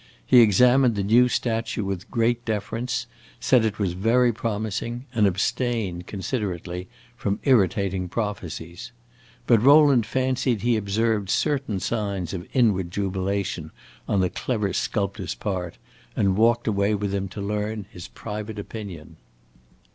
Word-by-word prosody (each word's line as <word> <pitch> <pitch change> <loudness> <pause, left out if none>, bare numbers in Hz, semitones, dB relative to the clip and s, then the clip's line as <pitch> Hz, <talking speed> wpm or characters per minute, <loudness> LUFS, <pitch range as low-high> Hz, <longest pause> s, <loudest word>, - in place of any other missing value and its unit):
He 120 - +7
examined 120 +3 +5
the 100 - -1
new 120 +5 +5
statue 115 -2 -1
with 95 -2 -4
great 120 0 +1
deference, 115 +2 -2 0.3
said 125 -3 +4
it 110 -2 -1
was 95 -4 -1
very 115 +6 +3
promising, 115 +3 -3
and 110 -3 +4
abstained, 100 -2 -1
considerately, 95 -4 -4 0.3
from 100 -4 -2
irritating 95 - +2
prophecies. 90 -6 -5 0.5
But 115 -3 +4
Rowland 140 -4 +6
fancied 130 -3 0
he 120 -1 +3
observed 105 -1 0
certain 135 -5 0
signs 100 -4 -2
of 90 0 -6
inward 105 -9 +2
jubilation 95 -3 -2 0.4
on 100 - +2
the 90 - 0
clever 105 -6 -2
sculptor's 100 -2 -2
part, 90 -4 -4 0.4
and 95 -2 +2
walked 115 +2 +3
away 100 -1 +1
with 100 -1 -2
him 100 0 -1
to 100 - -9
learn 105 +1 -3
his 90 0 -9
private 105 +1 -7
opinion. 100 -7 -8
105 Hz, 130 wpm, -24 LUFS, 95-115 Hz, 0.5 s, He